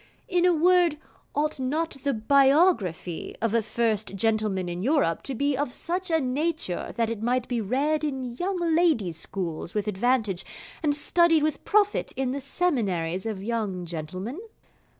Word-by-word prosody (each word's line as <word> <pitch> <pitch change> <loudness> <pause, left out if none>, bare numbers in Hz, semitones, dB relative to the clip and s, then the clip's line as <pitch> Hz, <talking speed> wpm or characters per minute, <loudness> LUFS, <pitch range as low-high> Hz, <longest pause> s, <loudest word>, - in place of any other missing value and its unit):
In 360 -5 +2
a 360 - +6
word, 345 -1 +4 0.4
ought 300 0 0
not 300 +4 -1
the 280 - +2
Biography 265 - +2
of 230 -1 0
a 230 - +3
First 220 -2 -1
Gentleman 215 -3 0
in 175 0 -4
Europe 260 - +2
to 270 - -4
be 280 +3 +1
of 275 -1 -1
such 365 +2 -3
a 325 -1 +3
nature 285 - -2
that 230 -1 +1
it 225 -2 -4
might 245 +2 0
be 240 -2 -1
read 280 +9 0
in 260 -5 -3
Young 375 +4 -1 0.2
Ladies' 270 - +2
Schools 170 -2 -5
with 210 -1 -1
advantage, 210 -2 +1 0.4
and 295 -2 +1
studied 330 +1 +3
with 305 -1 -1
profit 410 -1 +2
in 260 -1 -1
the 280 +1 -3
Seminaries 205 - -1
of 200 -3 -4
Young 210 -5 -2
Gentlemen? 185 - -5
255 Hz, 160 wpm, -26 LUFS, 205-310 Hz, 0.4 s, a